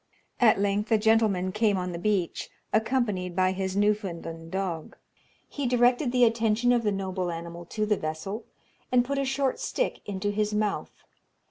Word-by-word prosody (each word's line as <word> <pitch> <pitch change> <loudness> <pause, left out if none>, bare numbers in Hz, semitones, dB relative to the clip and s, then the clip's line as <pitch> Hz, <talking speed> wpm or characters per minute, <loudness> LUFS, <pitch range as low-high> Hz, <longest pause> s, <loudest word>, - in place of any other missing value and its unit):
At 230 -5 +5
length 205 +2 0
a 220 - +6
gentleman 210 -4 +2
came 210 -1 +2
on 180 0 -2
the 170 - -5
beach, 195 -3 -1 0.2
accompanied 220 -6 0
by 185 0 +3
his 190 0 -2
Newfoundland 175 -6 -1
dog. 180 -4 -3 0.5
He 285 -3 -3
directed 245 +2 +3
the 250 0 +4
attention 230 +1 +3
of 240 -1 +3
the 210 -2 +1
noble 190 -2 -2
animal 170 +1 -6
to 215 +5 -2
the 210 -1 +1
vessel, 175 +8 -4 0.5
and 245 -1 +4
put 280 +2 -1
a 275 - 0
short 270 0 0
stick - - -2
into 205 0 -2
his 210 0 0
mouth. 210 -1 -2
210 Hz, 165 wpm, -27 LUFS, 185-230 Hz, 0.5 s, a